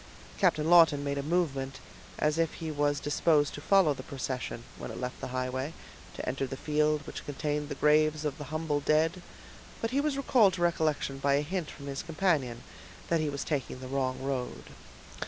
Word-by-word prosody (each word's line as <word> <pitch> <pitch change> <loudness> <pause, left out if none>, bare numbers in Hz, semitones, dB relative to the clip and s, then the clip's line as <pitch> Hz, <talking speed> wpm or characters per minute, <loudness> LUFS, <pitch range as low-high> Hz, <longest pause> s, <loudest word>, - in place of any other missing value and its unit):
Captain 155 0 +3
Lawton 165 -4 +6
made 140 0 -1
a - - 0
movement 140 -4 -1 0.4
as 150 +2 +1
if 165 -2 +1
he 160 -2 -4
was 145 -1 +1
disposed 145 0 +2
to 145 - -7
follow 185 -3 +4
the - - -8
procession, 130 -3 -4 0.2
when - - -6
it - - -6
left 125 0 -5
the - - -3
highway, 130 +3 -3 0.4
to - - -6
enter 135 +1 -1
the 135 - -6
field 150 0 +1
which - - -7
contained 150 0 -2
the - - -3
graves 155 0 +3
of 145 -1 -2
the 150 - -5
humble 155 0 -1
dead, 160 +4 +2 0.6
but 225 - -2
he 275 +2 +2
was 295 -2 0
recalled 235 -8 +4
to 180 - -4
recollection 155 -5 0
by 140 0 +3
a 140 - +2
hint 175 +1 -3
from 140 - -10
his 140 0 -4
companion 155 -9 0 0.5
that 170 - +3
he 155 - 0
was 140 -1 -3
taking 135 -4 -3
the 130 - -7
wrong 130 -1 -1
road. 135 -2 -4
150 Hz, 195 wpm, -30 LUFS, 135-160 Hz, 0.6 s, Lawton